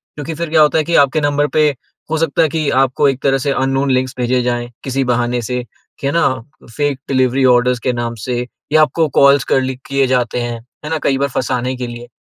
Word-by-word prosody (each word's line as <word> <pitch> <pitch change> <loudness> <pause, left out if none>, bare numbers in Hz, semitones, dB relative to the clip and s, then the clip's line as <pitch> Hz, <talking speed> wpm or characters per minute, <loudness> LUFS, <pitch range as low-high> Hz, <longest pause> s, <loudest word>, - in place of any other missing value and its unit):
क्योंकि 150 +2 -5
फिर 170 0 -4
क्या 160 -1 +4
होता 150 +1 +4
है 155 - +2
कि 170 +2 -1
आपके 150 +3 -2
नंबर 145 0 +1
पे 150 -1 +5 0.4
हो 160 - +1
सकता 165 0 +1
है 160 - +3
कि 155 -1 -1
आपको 135 +2 +1
एक 135 -1 -3
तरह 135 -1 +3
से 140 +2 -1
अननोन 135 0 0
लिंक 130 0 +1
भेजे 125 0 +1
जाएँ, 120 -1 -2
किसी 135 0 -1
बहाने 120 -1 0
से, 125 +2 -3 0.4
है 140 - +1
ना? 170 - +3 0.5
फ़ेक 145 -2 -1
डिलिवरी 130 0 +2
ऑर्डर्स 125 0 +2
के 125 - +2
नाम 120 -1 -3
से, 125 -1 -2 0.3
या 155 - +6
आपको 160 +1 +2
कॉल्स 140 -1 +5
करली 130 0 +1
किए 140 -1 +1
जाते 125 -1 0
हैं, 120 -1 -4 0.3
है - - -4
ना? 160 - +1
कई 135 -1 +2
बार 140 0 0
फँसाने 125 0 -2
के 125 -1 -5
लिए। 120 0 -9
135 Hz, 225 wpm, -17 LUFS, 125-145 Hz, 0.5 s, या